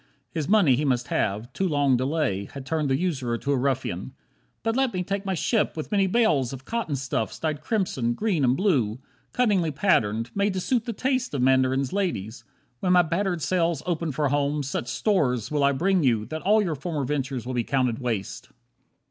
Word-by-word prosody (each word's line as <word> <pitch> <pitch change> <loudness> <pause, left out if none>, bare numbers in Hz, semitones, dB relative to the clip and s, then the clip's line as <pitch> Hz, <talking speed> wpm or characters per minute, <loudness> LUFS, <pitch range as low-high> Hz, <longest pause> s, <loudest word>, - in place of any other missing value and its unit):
His 160 -1 -3
money 195 -11 +5
he 145 - -1
must 125 -4 0
have, 110 +5 -1
too 190 - 0
long 145 -5 +2
delay 130 -6 0
Had 135 -2 -8
turned 150 0 -1
the 135 - +2
usurer 135 -9 -1
to 140 - -2
a - - +3
ruffian. 130 -5 -2 0.5
"But 225 +1 0
let 265 -1 +2
me 180 - -1
take 200 +2 -3
my 190 - 0
ship, 210 +2 0
with 155 - -5
many 200 -2 +3
bales 185 - +2
Of 130 0 -9
cotton 230 -11 -2
stuffs 130 -4 -2
dyed 155 -2 -2
crimson, 155 - -1
green, 200 -9 0
and 130 +1 +3
blue, 130 - +1 0.3
Cunningly 205 -9 +2
patterned, 130 - +1
made 200 0 +1
to 185 - -2
suit 235 +4 0
the 240 - -2
taste 255 - -1
Of 130 - 0
mandarin's 130 +1 +2
ladies; 120 - -2 0.4
when 180 -1 +2
my 180 0 +6
battered 175 0 -1
sails 170 -4 0
Open 165 -3 -1
for 145 +1 0
home, 145 +1 0
such 130 -2 -3
stores 125 - 0
will 145 -2 +1
I 140 - +5
bring 180 +7 +2
you 115 -6 +2
That 155 +4 -5
all 210 +2 +4
your 170 -5 -1
former 150 -1 -3
ventures 135 -3 -2
will 130 - -4
be 120 -1 0
counted 125 -3 0
waste. 115 -7 -4
145 Hz, 200 wpm, -25 LUFS, 130-185 Hz, 0.5 s, my